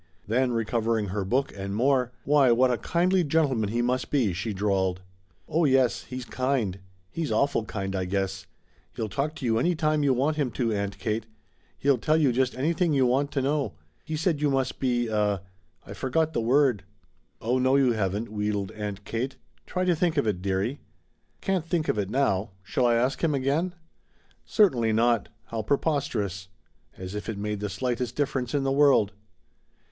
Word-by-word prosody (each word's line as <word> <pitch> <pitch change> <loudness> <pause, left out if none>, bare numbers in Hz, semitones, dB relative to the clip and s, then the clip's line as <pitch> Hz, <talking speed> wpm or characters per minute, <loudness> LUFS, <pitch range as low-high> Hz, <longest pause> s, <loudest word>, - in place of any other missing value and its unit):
Then, 125 +4 +1
recovering 115 -2 0
her 100 +1 -2
book 130 +8 0
and 100 0 -4
more 125 +1 +2
"Why 140 -3 +4
what 125 +2 +4
a 120 - 0
kindly 180 +2 +2
gentleman 140 -9 +1
he 120 +2 0
must 125 +1 0
be," 120 -10 +2
she 100 +6 -3
drawled. 95 -2 0 0.4
"Oh 165 +3 +1
yes, 130 -4 +3
he's 130 -1 -6
kind. 125 -8 -1 0.3
He's 165 -3 -3
awful 140 -5 +1
kind, 95 -2 -4
I 95 -1 -1
guess. 95 0 -2 0.5
He'll 110 -2 -3
talk 145 +9 -2
to 130 - -6
you 115 -1 +2
any 175 +7 +2
time 155 -1 +1
you 140 -3 +3
want 145 +5 +1
him 145 -4 +1
to, 115 -4 0
Aunt 100 -1 -2
Kate. 110 -1 -2 0.5
He'll 140 -3 +2
tell 155 +6 +2
you 145 -5 +3
just 125 +1 0
anything 165 +4 +1
you 135 -2 +4
want 135 +3 +2
to 135 - 0
know. 145 0 0 0.3
He 155 - -4
said 160 -2 0
you 150 - +3
must 135 -2 -1
be 120 -2 +1
a 105 -4 0 0.4
I 100 - -8
forgot 155 +8 0
the 120 - 0
word." 125 -3 +3 0.6
"Oh 125 +3 0
no, 130 +1 +3
you 135 -3 +4
haven't," 105 0 -1
wheedled 105 -2 -2
Aunt 105 -2 -6
Kate. 125 +4 -3 0.3
"Try 185 0 -1
to 180 -2 +3
think 165 -1 0
of 145 - +2
it, 100 -5 -1
dearie." 100 +8 -1 0.6
"Can't 185 -4 -1
think 165 -2 0
of 105 - +1
it 100 -2 -1
now. 110 -5 +1
Shall 125 +6 +1
I 120 - +3
ask 125 +6 0
him 155 -3 +2
again?" 145 +7 0 0.7
"Certainly 125 - +3
not! 115 0 +2
How 115 -1 -4
preposterous! 115 - -1 0.5
As 95 +1 -7
if 105 +2 -5
it 110 - -3
made 105 0 -3
the 105 0 -3
slightest 125 +4 -2
difference 135 -3 -1
in 140 - +1
the 135 - +1
world!" 135 -8 +4
125 Hz, 185 wpm, -26 LUFS, 105-140 Hz, 0.7 s, Why